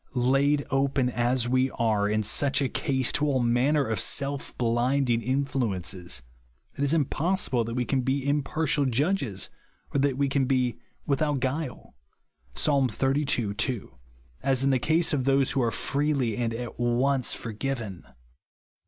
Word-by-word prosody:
Laid 135 +3 +2
open, 135 -1 +1
as 120 0 +1
we 130 +1 +2
are, 110 -4 0
in 110 0 +1
such 135 +7 +1
a 140 - +1
case, 130 -1 0
to 150 - +1
all 135 -2 +1
manner 125 +5 +2
of 110 -4 -2
self 140 +5 -1
blinding 120 +1 +1
influences, 105 - -2 0.5
it 140 - -2
is 140 - +2
impossible 160 -3 +1
that 115 +1 -4
we 125 -1 0
can 135 +1 0
be 135 +2 -1
impartial 145 0 +1
judges, 130 - 0 0.4
or 140 - +2
that 135 -2 +1
we 140 0 +2
can 135 0 +1
be 125 -3 0
" - - -39
without 145 0 +1
guile'' 135 +1 -4 0.6
(Psa. 140 -3 +3
xxxii. 135 -3 0
2), 105 - -3 0.5
as 135 -1 +1
in 135 - +3
the 130 - +2
case 160 +6 +2
of 135 -3 0
those 135 -1 +3
who 135 - 0
are 120 - +2
freely 140 -3 0
and 115 0 -1
at 120 0 -6
once 125 +2 +1
forgiven. 115 -4 -5
130 Hz, 155 wpm, -27 LUFS, 120-140 Hz, 0.6 s, Psa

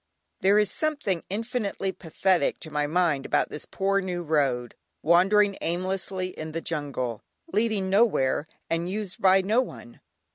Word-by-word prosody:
There 200 +2 +4
is 210 -2 +3
something 290 - -1
infinitely 210 -2 -2
pathetic 180 -1 0
to 160 - -9
my 150 0 0
mind 160 -4 +1
about - - +1
this 150 - -6
poor 195 +1 +1
new 180 -2 -3
road, 135 -6 0 0.3
wandering 195 +5 +4
aimlessly 185 +1 -2
in 155 -3 -7
the 165 - -2
jungle, 140 -9 -3 0.3
leading 210 -2 +1
nowhere 195 - +2 0.2
and 165 +1 -1
used 200 -1 -4
by 190 0 +6
no 215 +6 +2
one. 120 - -9
185 Hz, 145 wpm, -26 LUFS, 155-200 Hz, 0.3 s, by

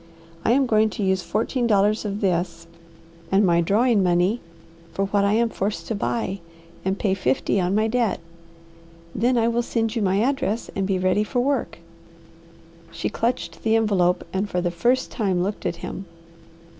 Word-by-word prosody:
I 230 - +3
am 270 +1 +3
going 220 -2 +3
to 210 - -1
use 190 -1 +1
fourteen 235 +6 -1
dollars 210 0 +2
of 205 0 -3
this 175 -3 -1 0.7
and 195 +2 +4
my 170 -1 +3
drawing 215 +5 +3
money 180 +5 +2 0.5
for 195 - -1
what 200 +1 +1
I 200 +1 +2
am 230 +1 +2
forced 195 -5 -3
to - - 0
buy, 200 -2 -2 0.4
and 190 +1 -1
pay 200 -2 +1
fifty 185 +2 0
on 180 +2 0
my 215 +1 +2
debt. 235 -2 0 0.9
Then 245 +2 +1
I 230 -1 +3
will 235 0 +1
send 225 -1 -1
you 230 - 0
my 195 0 +2
address 240 -2 -1
and 195 -1 -1
be 195 -1 +1
ready 185 +3 +2
for 245 +4 -2
work." 270 +1 -1 1.1
She 165 0 -3
clutched 230 -8 -2
the 225 0 +2
envelope 185 -5 +2
and 195 +2 -1
for 180 - -1
the 175 -1 -1
first 245 +9 +1
time 190 -6 0
looked 200 +2 -3
at - - -2
him. 195 - -6
205 Hz, 180 wpm, -23 LUFS, 185-230 Hz, 1.1 s, and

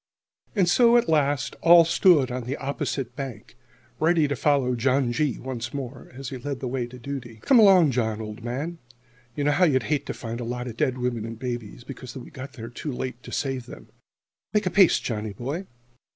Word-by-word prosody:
And 190 -4 +3
so, 235 +6 +5
at 235 - +2
last, 145 -4 +1
all 170 0 +8
stood 165 -5 +4
on 125 -1 -4
the 135 +4 -3
opposite 135 -2 -3
bank, 130 -6 -7 0.4
ready 160 -1 +3
to 140 - -1
follow 140 -4 +2
John 130 +1 +1
G. 135 +2 0
once 125 -1 -5
more, 130 -2 -6
as 135 -1 -6
he 130 -2 -6
led 140 +1 -4
the 130 - -4
way 125 -1 -2
to 125 +1 -11
duty. 125 -3 -7
"Come 265 -3 +5
along, 190 -8 +7
John, 110 -3 -1
old 110 +1 -7
man. 145 +8 -4 0.6
You 145 - -2
know 145 - +3
how 180 +5 +4
you'd 130 -6 +2
hate 145 - -2
to - - -3
find 115 0 -6
a - - -4
lot 125 +1 -4
of 115 - -6
dead 130 +2 0
women 125 -3 -2
and 115 0 -6
babies 120 -2 -5
because 130 -1 -9
we 125 - -10
got 135 +2 -8
there 115 -3 -8
too 140 +5 -5
late 125 -1 -5
to - - -11
save 135 -3 -2
them! - - -12 0.7
Make 210 -1 +3
a 185 - 0
pace, 190 -1 +5
Johnny 110 -3 -4
boy!" 140 - -5
130 Hz, 210 wpm, -25 LUFS, 120-150 Hz, 0.7 s, all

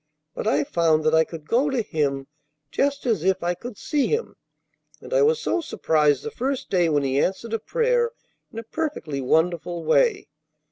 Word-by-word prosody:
But - - -4
I 145 +1 +2
found 160 0 +2
that 155 0 +2
I 160 0 +5
could 160 -2 -10
go 265 +5 +2
to 260 -4 0
Him 140 -7 -1 0.5
just 280 0 0
as 220 -10 +1
if 190 -1 +1
I 175 +1 +1
could 235 +4 -9
see 290 -3 0
Him, 450 +1 -2 0.6
and - - -9
I - - +4
was 455 +1 +3
so 355 - 0
surprised 150 - +1
the - - -5
first 265 +1 -3
day 175 -3 +3
when 145 -2 +1
He 135 0 +1
answered 205 +7 -1
a 225 - 0
prayer 475 - +1 0.4
in - - -12
a 230 - -4
perfectly 225 - -4
wonderful 170 +4 0
way. 465 - +2
190 Hz, 190 wpm, -24 LUFS, -, 0.6 s, I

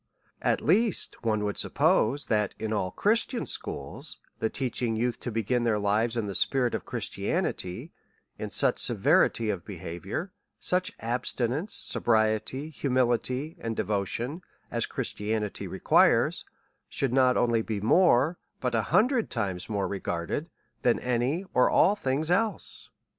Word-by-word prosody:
At - - +1
least 205 +6 +1
one 110 -2 +1
would 105 -1 -2
suppose, 140 +7 +2
that 105 -3 0
in 110 0 -3
all 95 -3 0
Christian 230 - 0
schools, - - -1 0.2
the 110 - 0
teaching 120 -2 -1
youth 120 +1 -1
to - - -5
begin 115 +2 0
their 115 -3 +2
lives 110 +3 +1
in 115 - 0
the 100 - -4
spirit 125 +6 +2
of - - -4
Christianity, 90 0 -2 0.5
in - - -4
such - - +2
severity 110 -2 +2
of 95 -4 -5
behaviour, 95 - -6 0.3
such 180 0 +1
abstinence, 125 - -1
sobriety, 110 +6 +1
humility, 130 +1 0
and 115 -1 -3
devotion, 115 - -2 0.3
as - - -1
Christianity 105 0 -3
requires, - - +3 0.4
should 135 -3 -1
not 130 -1 +4
only 120 -2 +2
be 110 -2 -3
more, 150 - +3 0.2
but 125 -2 -2
an 110 -2 +1
hundred 230 - +2
times 95 -6 -2
more 100 -2 -1
regarded, 95 - -3 0.3
than 120 - +3
any, 125 +9 -1
or 125 - +4
all 200 - +5
things 150 -1 -1
else. 215 +4 -1
120 Hz, 135 wpm, -27 LUFS, 110-140 Hz, 0.5 s, all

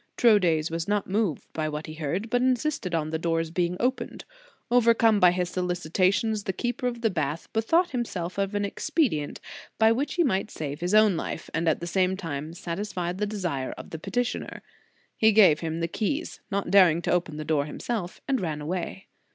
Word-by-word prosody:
Troades 175 -9 +4
was 165 0 -3
not 205 -1 0
moved 200 -5 -1
by 155 -1 -1
what 150 +1 -5
he 155 - -8
heard, 165 +8 -3
but 245 - +2
insisted 255 - 0
on 155 -1 -1
the 160 - -1
doors 165 -1 -1
being 175 +1 0
opened. 255 +2 -2 0.5
Overcome 230 -3 +4
by 180 - +7
his 180 0 -1
solicitations, 185 +4 0
the 190 - -1
keeper 245 +4 -2
of 240 -1 -4
the 225 -2 +2
bath 155 -2 -2
bethought 325 +11 +2
himself 200 -8 -3
of 200 +1 -1
an 205 0 +1
expedient 210 - -1 0.4
by 220 0 +5
which 265 +6 -1
he 350 - +3
might 210 -7 0
save 145 -5 -5
his 180 +4 0
own 215 -3 +6
life - - -5
and 165 0 +1
at 160 - 0
the - - -3
same 185 +1 +1
time 160 -2 -5
satisfy 180 0 -3
the 210 +3 -2
desire 175 -11 -3
of - - -10
the 160 - -5
peti 195 +8 -1
tioner. 245 - -5 0.6
He 220 0 +5
gave 195 -8 +6
him 165 0 -3
the 165 - 0
keys, 280 - -3
not 200 -1 -2
daring 175 -4 +6
to - - 0
open 170 -4 0
the 155 - -5
door 150 -2 +1
himself, 180 +4 -4
and 270 -4 +1
ran 155 -4 -2
away. 175 +5 -4
185 Hz, 200 wpm, -26 LUFS, 165-220 Hz, 0.6 s, by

